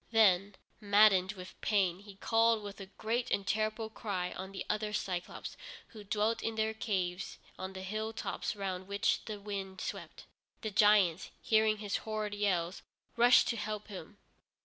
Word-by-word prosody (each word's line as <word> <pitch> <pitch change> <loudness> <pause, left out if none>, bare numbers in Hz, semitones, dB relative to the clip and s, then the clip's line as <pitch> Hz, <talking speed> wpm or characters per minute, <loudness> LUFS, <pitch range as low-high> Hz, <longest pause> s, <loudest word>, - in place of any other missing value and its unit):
Then, 200 -3 +4 0.2
maddened 205 -2 +5
with 185 -2 -11
pain, 190 -4 +2
he 200 0 -13
called 225 +1 +3
with 205 0 -8
a 195 - -7
great 225 +5 -2
and 200 - 0
terrible 215 +1 0
cry 190 -5 -3
on 190 +1 -6
the 195 - -5
other 210 0 -1
Cyclôpes, 180 -4 -3 0.3
who 215 -2 -11
dwelt 210 +2 0
in 225 - -2
their 220 0 0
caves 185 -5 -2 0.2
on 190 0 -5
the 190 0 -7
hill 215 +3 -3
tops 215 - -3
round 190 -2 -4
which 200 +1 +1
the 215 -2 -5
wind 195 -2 -5
swept. - - -6 0.4
The 220 - -3
giants, 200 -4 +4
hearing 220 -1 +3
his 205 -1 -2
horrid 215 -1 -3
yells, 190 -4 0 0.3
rushed 240 +1 +6
to 235 - 0
help 210 0 -4
him. 200 +1 -9
205 Hz, 165 wpm, -33 LUFS, 190-215 Hz, 0.4 s, rushed